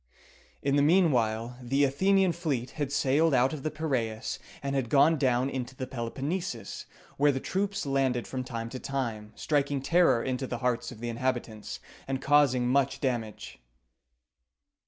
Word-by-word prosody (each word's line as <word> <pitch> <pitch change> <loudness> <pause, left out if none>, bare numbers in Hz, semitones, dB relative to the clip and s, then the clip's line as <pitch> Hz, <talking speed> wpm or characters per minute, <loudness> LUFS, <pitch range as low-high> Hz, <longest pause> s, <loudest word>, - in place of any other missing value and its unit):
In 140 +1 +2
the - - +4
mean 170 +3 +5
while 115 0 -1
the 135 +4 +1
Athenian 190 +7 +3
fleet 145 -8 -2
had 145 -3 -3
sailed 145 +2 +3
out 130 +3 +3
of 150 - -5
the 155 - -1
Piræus, 130 -8 -2 0.2
and 140 0 -2
had 130 -4 -1
gone 145 +5 +5
down 130 -3 +2
into 130 -1 -4
the 130 - -4
Peloponnesus, 130 - -4 0.3
where 145 +1 +4
the 135 - -2
troops 195 +4 -2
landed 135 -3 +1
from 130 -1 -4
time 115 -2 -5
to 130 - -6
time, 115 -7 -3
striking 145 -2 0
terror 165 -4 +3
into 130 0 -2
the 120 - -3
hearts 125 0 -1
of 115 -2 -11
the 120 - -3
inhabitants, 120 -3 -3 0.3
and 135 -1 -1
causing 135 -3 +3
much 135 +1 +2
damage. 120 -6 -3
135 Hz, 160 wpm, -28 LUFS, 120-145 Hz, 0.3 s, mean